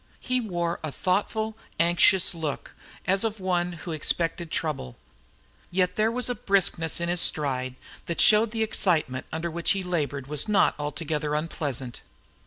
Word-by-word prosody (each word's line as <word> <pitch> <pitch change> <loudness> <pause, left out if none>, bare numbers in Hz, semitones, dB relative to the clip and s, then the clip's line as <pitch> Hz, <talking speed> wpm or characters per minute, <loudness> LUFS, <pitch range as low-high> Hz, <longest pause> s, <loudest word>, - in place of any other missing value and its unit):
He 255 -1 0
wore 175 -5 -2
a 155 - -3
thoughtful, 215 +6 -1 0.2
anxious 175 +3 +4
look, 160 -4 -4 0.3
as 195 +2 +2
of 220 -2 -2
one 180 -1 0
who 165 0 -7
expected 165 +2 -1
trouble. 150 - -3 0.7
Yet 180 0 +1
there 215 +1 +3
was 250 +1 -1
a 245 - +1
briskness 195 -7 +1
in 170 - -1
his 175 0 0
stride 130 -4 0 0.3
that 170 - -3
showed 215 +1 +6
the 225 0 0
excitement 160 -11 +1
under 165 +1 -3
which 170 +3 +1
he 195 -1 -2
labored 145 -7 -2
was 150 +8 0
not 210 - +4
altogether 150 0 -2
unpleasant. 140 -5 -3
170 Hz, 155 wpm, -26 LUFS, 150-195 Hz, 0.7 s, showed